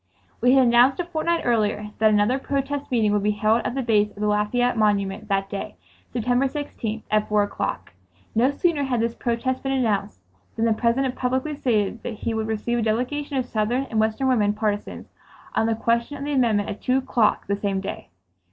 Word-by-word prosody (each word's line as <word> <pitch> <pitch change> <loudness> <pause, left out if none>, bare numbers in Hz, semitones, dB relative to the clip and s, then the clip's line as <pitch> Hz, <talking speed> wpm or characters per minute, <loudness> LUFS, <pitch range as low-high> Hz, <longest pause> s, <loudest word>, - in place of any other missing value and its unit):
We 250 +1 +5
had 265 -1 +6
announced 245 +4 +5
a 355 - -1
fortnight 335 0 -1
earlier 210 -3 0
that 220 0 +5
another 215 +5 +2
protest 275 +1 -3
meeting 225 -4 +2
would 205 - +2
be 210 - +1
held 215 +2 +3
at - - -3
the 270 - -1
base 210 -3 +2
of - - -22
the 210 +1 -3
Lafayette 210 +4 +1
Monument 205 -1 0
that 195 -1 0
day, 200 0 -6 0.4
September 245 +3 +1
16th, 230 -6 -5
at 215 0 +1
four 210 -1 +3
o'clock. 205 - -4 0.4
No 240 +4 +3
sooner 290 0 0
had 250 -3 0
this 230 +1 0
protest 245 +2 -2
been 270 0 -1
announced 210 - 0 0.4
than 225 - 0
the 225 - +3
President 250 +4 +1
publicly 260 +4 -1
stated 225 -5 0
that 230 - -5
he 225 +2 -3
would 220 0 -2
receive 225 +2 -1
a - - 0
delegation 255 +6 -1
of 255 - 0
Southern 235 +3 0
and 220 - +1
Western 220 +5 +1
women 210 -5 +2
partisans 210 -1 -3 0.5
on 225 - +1
the 225 - +1
question 235 +5 0
of 280 - -6
the 290 0 -2
amendment 225 -6 +2
at 205 - -6
two 255 +1 +2
o'clock 245 -5 +1
the 200 - 0
same 200 -1 -1
day. 195 - -6
230 Hz, 205 wpm, -23 LUFS, 210-260 Hz, 0.5 s, had